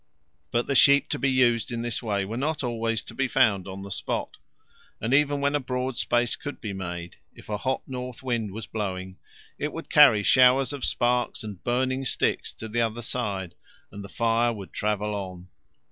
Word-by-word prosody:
But 120 0 0
sheep 140 +1 +6
to - - -2
be 140 - +2
used 125 -3 +2
in 120 -1 -3
this 120 -1 -2
way 100 -4 -1
were 110 +4 -5
not 145 +4 -1
always 115 -2 -1
to - - -9
be 135 0 0
found 100 -5 +2
on 95 0 -7
the 100 - -8
spot, - - -3 0.6
and 115 +4 -1
even 145 0 +3
when 140 +1 +1
a 145 - +2
broad 125 -1 -3
space 120 0 +1
could 145 - -7
be 105 -3 -5
made, 90 -2 -6 0.2
if - - -15
a 105 - -1
hot 130 +3 -1
north 125 -1 -6
wind 120 -5 -1
was 110 +3 -6
blowing 95 -3 -4 0.4
it 150 - -2
would 165 - -7
carry 130 -9 +7
showers 130 +4 +5
of 140 - -6
sparks 120 -1 0
and 105 -4 -8
burning 130 +2 0
sticks - - 0
to 110 - -7
the 115 +2 0
other 115 +1 -1
side 100 -7 -3 0.4
and 100 - -8
the 100 - -9
fire 115 +1 +2
would 100 -4 -8
travel 105 0 -1
on. 95 -2 -6
115 Hz, 195 wpm, -26 LUFS, 100-130 Hz, 0.6 s, carry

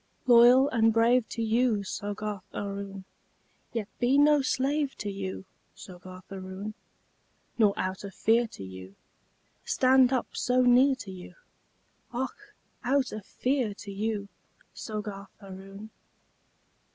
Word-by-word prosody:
Loyal 245 +2 +7
and 225 -1 +3
brave 230 +1 +3
to 230 - -3
you, 225 -2 +2
Soggarth 205 +1 -4
Aroon, 200 -1 -5 0.7
Yet 225 -4 -3
be 255 +3 +3
no 295 0 +5
slave 275 +2 0
to 205 - -4
you, 190 -1 -5 0.3
Soggarth 185 +1 -12
Aroon, 190 +2 -6 0.9
Nor 210 -3 +4
out 185 +1 -3
of 200 -2 -8
fear 230 +2 +3
to 100 - -10
you 95 +1 -10 0.7
Stand 260 0 +4
up 255 -3 -2
so 250 0 +2
near 255 +2 +5
to 205 -6 -9
you 180 -1 -11 0.8
Och! 415 - -5 0.3
out 265 +1 +1
of 215 -2 -8
fear 250 -5 -1
to 200 - -9
you! 205 0 -3 0.5
Soggarth 210 -2 -6
Aroon! 195 +2 -11
215 Hz, 125 wpm, -28 LUFS, 195-250 Hz, 0.9 s, Loyal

